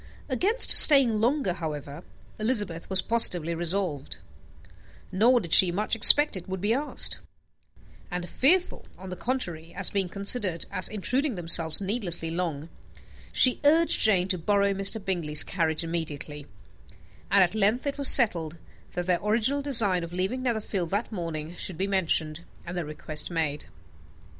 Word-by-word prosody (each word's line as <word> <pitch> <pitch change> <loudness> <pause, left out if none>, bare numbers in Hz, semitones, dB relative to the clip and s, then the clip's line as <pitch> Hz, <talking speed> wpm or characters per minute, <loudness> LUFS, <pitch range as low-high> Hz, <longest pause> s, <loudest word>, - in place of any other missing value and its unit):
Against 390 - +2
staying 265 -8 +8
longer, 245 -5 -1
however, 150 -2 -8 0.4
Elizabeth 210 -7 -3
was 190 -1 +4
positively 175 -8 +2
resolved 170 -4 -4 0.9
nor 240 +6 +2
did 170 -6 -5
she 180 -1 +6
much 210 +6 -3
expect 295 +6 +8
it 185 0 -10
would 190 0 -6
be 205 +4 -2
asked; 290 +4 +2 0.9
and 180 -1 -6
fearful, 355 - -1
on 190 0 -12
the - - -6
contrary, 175 -6 -6
of 195 - -3
being 195 -3 -3
considered 200 -2 -1
as 185 -2 -2
intruding 250 +6 -3
themselves 165 -2 +2
needlessly 190 -5 -4
long, 165 -3 -5 0.6
she 255 - +1
urged 320 +3 +2
Jane 190 -4 +2
to 185 -2 -2
borrow 200 +3 -1
Mr. 195 +3 +5
Bingley's 170 -7 0
carriage 165 -2 -3
immediately, 150 -3 -7 0.8
and 200 -1 +3
at 180 - -2
length 220 +4 -1
it 285 0 -5
was 280 - +3
settled 170 - +3 0.4
that 175 - -5
their 180 -1 -2
original 230 +7 -1
design 220 -11 0
of 170 +1 -10
leaving 190 +8 -4
Netherfield 215 -8 -4
that 205 +6 -4
morning 165 -4 -7
should 185 - -4
be 190 - -3
mentioned, 170 -4 -3 0.2
and 175 +1 -9
the 175 -3 -5
request 150 0 -7
made. 155 -4 -5
190 Hz, 150 wpm, -24 LUFS, 170-225 Hz, 0.9 s, staying